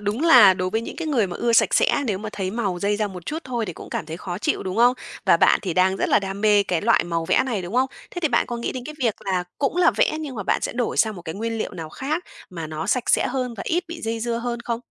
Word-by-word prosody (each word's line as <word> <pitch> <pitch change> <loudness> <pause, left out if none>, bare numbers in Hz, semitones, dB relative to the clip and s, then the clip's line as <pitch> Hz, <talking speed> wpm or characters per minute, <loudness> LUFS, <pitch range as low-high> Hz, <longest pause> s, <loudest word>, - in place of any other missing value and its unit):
đúng 210 +6 -2
là 245 - +8
đối 185 0 -2
với 220 - 0
những - - -7
cái 330 -2 -4
người 235 -9 +2
mà 175 - -6
ưa 235 -1 0
sạch - - +4
sẽ, 285 - +3
nếu 195 -4 -1
mà 215 +1 -6
thấy 190 -2 -3
màu 200 -5 -2
dây 205 +2 0
ra 210 -1 0
một 180 -2 -10
chút 310 - -3
thôi 240 -4 -2
thì 180 - -4
cũng - - -11
cảm - - -3
thấy 160 - -6
khó 180 0 -5
chịu, 300 - -1
đúng 185 +2 -4
không? 245 +2 +5 0.3
Và - - +5
bạn - - +4
thì 180 -4 -3
đang 190 +1 +3
rất - - -1
là - - +5
đam 195 0 -5
mê 210 -1 +5
cái 175 -4 -1
loại 230 +1 +3
màu 165 -1 -2
vẽ - - +3
này, 215 -7 -2
đúng 180 +6 -7
không? 260 +1 +3 0.2
Thế 350 - -6
thì 315 - +3
bạn 235 - +2
có 240 - -4
nghĩ 235 - -3
đến 250 -1 -6
cái 305 - -7
việc 230 -5 +1
là 185 -2 0
cũng 285 +4 0
là 360 - +5
vẽ - - +1
nhưng 285 -4 -6
mà 205 - -4
bạn - - 0
sẽ - - -2
đổi 240 -1 -2
sang 220 -2 +2
một 175 - -9
cái 160 -1 -6
nguyên 225 +2 -3
liệu - - -3
nào 165 -3 -6
khác 305 - -3 0.3
mà 165 -3 -6
nó 155 +1 -5
sạch 250 -2 +1
sẽ - - +3
hơn 250 -2 -3
và 210 - -6
ít 350 +2 0
bị 335 -1 -7
dây 225 0 -3
dưa 235 0 -1
hơn 240 0 -3
không? 235 -1 -3
220 Hz, 315 wpm, -23 LUFS, 185-245 Hz, 0.3 s, là